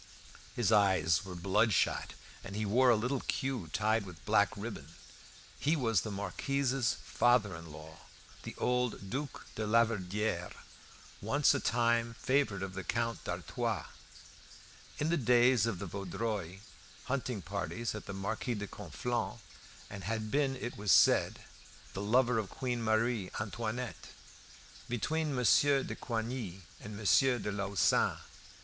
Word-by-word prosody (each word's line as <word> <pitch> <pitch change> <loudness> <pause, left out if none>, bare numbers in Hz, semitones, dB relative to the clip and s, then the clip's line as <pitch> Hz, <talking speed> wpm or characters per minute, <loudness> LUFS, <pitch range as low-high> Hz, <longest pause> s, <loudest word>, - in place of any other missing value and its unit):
His 120 -3 +1
eyes 95 -7 +4
were 95 -2 -8
bloodshot, 100 +4 +1 0.3
and 100 - -7
he 110 +1 -1
wore 125 +5 +4
a 120 - +6
little 125 +5 -1
queue 130 - -2
tied 110 +3 +1
with 90 -5 -12
black - - +4
ribbon. 80 +4 -7 0.6
He 155 +3 +2
was 115 - +2
the 110 - -5
Marquis's 125 +6 -1
father 120 -6 +2
in 80 -1 -10
law, 80 +1 -11 0.4
the - - -8
old 125 -6 -1
Duke 140 +1 -4
de 110 -1 -3
Laverdiere, 110 -2 +1 0.7
once 140 +8 +3
on - - -1
a - - -14
time 115 -1 +1
favourite 130 -8 +1
of 95 -1 -5
the 95 -1 -5
Count 115 +4 -2
d'Artois, - - -2 1.1
in 150 - 0
the 170 - +2
days 125 -1 +4
of 110 -5 -1
the 100 - -5
Vaudreuil 100 0 -4 0.5
hunting 125 -6 -3
parties 110 +9 -3
at 105 - -8
the 100 - -5
Marquis 110 +5 -2
de 105 -1 -4
Conflans', 115 +6 -3 0.5
and 100 -2 -8
had 110 0 -2
been, 140 -2 +1
it 120 -1 -5
was 100 -2 +1
said, 80 - +5 0.5
the 95 - -4
lover 120 +3 +3
of 105 -3 -4
Queen 125 -2 -3
Marie 110 -2 +1
Antoinette, 115 +3 -4 0.8
between 150 +5 -1
Monsieur 135 +3 +4
de - - -5
Coigny 115 -5 -4 0.2
and 105 -1 -8
Monsieur 110 +5 +4
de 105 -2 -3
Lauzun. 100 -2 +2
110 Hz, 140 wpm, -32 LUFS, 100-125 Hz, 1.1 s, a